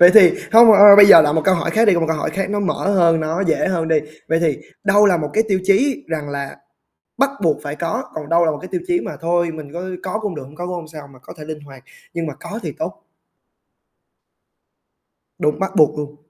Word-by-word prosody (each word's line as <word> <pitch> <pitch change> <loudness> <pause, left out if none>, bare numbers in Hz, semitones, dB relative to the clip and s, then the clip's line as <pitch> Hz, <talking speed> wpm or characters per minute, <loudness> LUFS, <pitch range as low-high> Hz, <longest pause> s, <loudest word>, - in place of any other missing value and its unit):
Vậy 175 +1 +8
thì 185 -6 +7 0.2
hông 230 0 +8
bạn 200 -1 +5
ơi, 205 -1 +9
bây 200 -1 +8
giờ 170 -5 +9
là 150 0 0
một 160 0 0
câu 190 - +3
hỏi 170 - -3
khác 225 +1 +2
đi, 205 -4 +4
còn 170 - -1
một - - 0
câu 160 - -1
hỏi - - -3
khác 195 0 -4
nó 205 0 -2
mở 200 0 -2
hơn, 165 -3 +2
nó 160 +4 -3
dễ 170 -2 0
hơn 165 -3 -2
đi. 160 -1 +2 0.3
Vậy 165 +1 +1
thì 155 -5 -1 0.3
đâu 205 +1 +4
là 180 -3 +3
một 150 -2 -4
cái 220 - +2
tiêu 190 -2 0
chí 270 +9 +1
rằng 155 -3 -5
là 140 -1 -6 0.6
bắt 275 0 +2
buộc 155 -3 +1
phải 145 0 -6
có, 210 +11 -4
còn 150 -2 -7
đâu 170 0 +2
là 160 - +1
một 150 - -6
cái 185 - -9
tiêu 355 - -3
chí 350 0 0
mà - - -7
thôi 170 0 -1
mình 155 -1 -11
có 175 - -6 0.2
có 195 +3 -4
cũng 205 -6 -5
được, 150 - -7
hông 140 +3 -16
có 175 - -7
cũng 180 - -5
hông 170 -3 -8
sao, 155 -2 -12
mà 130 - -18
có - - -12
thể 150 - -10
linh 155 -1 -8
hoạt, 135 -2 -15 0.3
nhưng 165 -2 -4
mà 145 - -6
có - - -8
thì - - -5
tốt? - - -6 2.4
Đúng, 150 0 -1
bắt 195 0 -4
buộc 150 -1 +3
luôn. 145 0 -7
170 Hz, 265 wpm, -18 LUFS, 155-195 Hz, 2.4 s, ơi